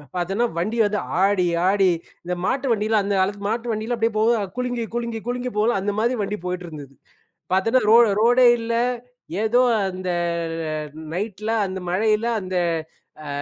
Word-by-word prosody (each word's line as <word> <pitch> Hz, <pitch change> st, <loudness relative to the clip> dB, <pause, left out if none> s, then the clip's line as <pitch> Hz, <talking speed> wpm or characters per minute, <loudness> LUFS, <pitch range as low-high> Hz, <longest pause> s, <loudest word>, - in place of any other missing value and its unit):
பார்த்தேன்னா 195 Hz, +7 st, 0 dB
வண்டி 215 Hz, +7 st, -1 dB
வந்து 210 Hz, 0 st, 0 dB, 0.2 s
ஆடி 195 Hz, -2 st, +3 dB, 0.2 s
ஆடி 195 Hz, -1 st, +4 dB, 0.3 s
இந்த 180 Hz, -, -3 dB
மாட்டு 275 Hz, +1 st, 0 dB
வண்டில 215 Hz, 0 st, +1 dB
அந்த 200 Hz, -, -1 dB
காலத்துல 200 Hz, +1 st, -1 dB
மாட்டு 230 Hz, +2 st, -2 dB
வண்டியில 220 Hz, +3 st, -2 dB
அப்டியே 225 Hz, 0 st, 0 dB
போகுது 225 Hz, +1 st, +3 dB, 0.2 s
குலுங்கி 245 Hz, -1 st, -2 dB
குலுங்கி 235 Hz, -1 st, -2 dB
குலுங்கி 250 Hz, +1 st, -2 dB
போகும்ல 220 Hz, +1 st, +2 dB
அந்த 205 Hz, -, -1 dB
மாரி 240 Hz, +3 st, +1 dB
வண்டி 205 Hz, +1 st, -2 dB
போயிட்டிருந்தது. 165 Hz, -6 st, -6 dB, 0.6 s
பார்த்தேன்னா 225 Hz, +7 st, +3 dB
ரோ 225 Hz, -, +8 dB, 0.2 s
ரோடே 245 Hz, +2 st, +5 dB
இல்ல. 230 Hz, 0 st, -3 dB, 0.7 s
ஏதோ 235 Hz, +3 st, +3 dB, 0.3 s
அந்த 185 Hz, 0 st, -5 dB, 1.0 s
நைட்ல 210 Hz, +3 st, -4 dB, 0.2 s
அந்த 190 Hz, 0 st, -5 dB
மழையில 215 Hz, +4 st, +1 dB, 0.2 s
அந்த 185 Hz, 0 st, -5 dB, 0.7 s
ஆ -, -, -7 dB
215 Hz, 150 wpm, -22 LUFS, 190-235 Hz, 1.0 s, ரோ